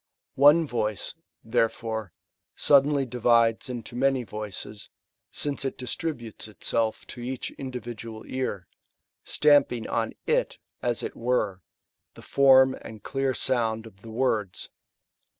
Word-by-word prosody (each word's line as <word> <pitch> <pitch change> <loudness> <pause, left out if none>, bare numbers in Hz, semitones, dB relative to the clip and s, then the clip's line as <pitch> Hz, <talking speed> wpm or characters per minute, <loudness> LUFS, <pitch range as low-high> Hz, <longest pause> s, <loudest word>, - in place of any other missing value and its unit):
One 150 +4 +7
voice, 110 -6 -2 0.3
therefore, 115 -3 -1 0.4
suddenly 140 0 +4
divides 115 -1 +2
into 120 -1 -6
many 135 0 +2
voices, 105 -1 -7 0.4
since 145 -1 -1
it 135 - -3
distributes 125 -4 -4
itself 110 +1 -1
to 120 - -9
each 125 +1 -4
individual 120 -4 -7
ear, 125 -9 -3 0.6
stamping 145 -6 +3
on 115 -1 -1
t/; - - +1
a« - - +3 0.4
it 120 -1 -2
were, 115 -6 0 0.5
the - - -13
form 130 -1 +6
and 110 -2 -10
clear 135 -1 -1
sound 115 -3 +1
of 100 -3 -15
the 115 - -11
words. 110 -5 -1
120 Hz, 115 wpm, -26 LUFS, 110-130 Hz, 0.6 s, One